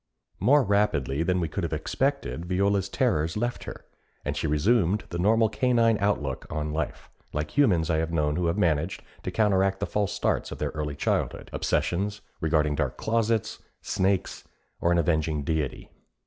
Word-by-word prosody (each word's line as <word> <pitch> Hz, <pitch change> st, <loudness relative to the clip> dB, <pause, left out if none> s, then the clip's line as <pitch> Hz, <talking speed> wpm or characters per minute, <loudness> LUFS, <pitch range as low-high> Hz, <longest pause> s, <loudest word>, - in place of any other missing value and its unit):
More 140 Hz, +9 st, +5 dB
rapidly 80 Hz, -, +1 dB
than 90 Hz, +2 st, +1 dB
we 85 Hz, -, 0 dB
could 85 Hz, +5 st, -4 dB
have 85 Hz, -, -2 dB
expected 130 Hz, -, -1 dB
Viola's 100 Hz, +1 st, +1 dB
terrors 90 Hz, -, 0 dB
left 120 Hz, +3 st, -2 dB
her, -, -, -8 dB, 0.4 s
and -, -, -2 dB
she -, -, -1 dB
resumed 95 Hz, +6 st, +2 dB
the 85 Hz, -, -4 dB
normal 110 Hz, +4 st, +4 dB
canine 115 Hz, 0 st, +2 dB
outlook 75 Hz, -10 st, -1 dB
on 75 Hz, 0 st, -3 dB
life 75 Hz, -2 st, -4 dB, 0.2 s
like 75 Hz, 0 st, -3 dB
humans 95 Hz, -, +3 dB
I 80 Hz, -, +2 dB
have 80 Hz, +1 st, -1 dB
known 75 Hz, -2 st, +1 dB
who 90 Hz, 0 st, 0 dB
have 85 Hz, +4 st, 0 dB
managed 85 Hz, -2 st, 0 dB, 0.2 s
to -, -, -4 dB
counteract 95 Hz, -3 st, +2 dB
the 100 Hz, -, -1 dB
false 105 Hz, -1 st, -1 dB
starts -, -, -1 dB
of -, -, -6 dB
their -, -, -2 dB
early 75 Hz, -2 st, -4 dB
childhood -, -, -1 dB
obsessions 100 Hz, +3 st, -1 dB, 0.2 s
regarding 75 Hz, -3 st, +2 dB
dark -, -, -2 dB
closets, 115 Hz, -1 st, 0 dB, 0.2 s
snakes, 95 Hz, 0 st, 0 dB, 0.4 s
or 85 Hz, -, +2 dB
an 85 Hz, -, +3 dB
avenging 80 Hz, -2 st, +1 dB
Deity. 75 Hz, -4 st, -2 dB
90 Hz, 170 wpm, -26 LUFS, 80-105 Hz, 0.4 s, More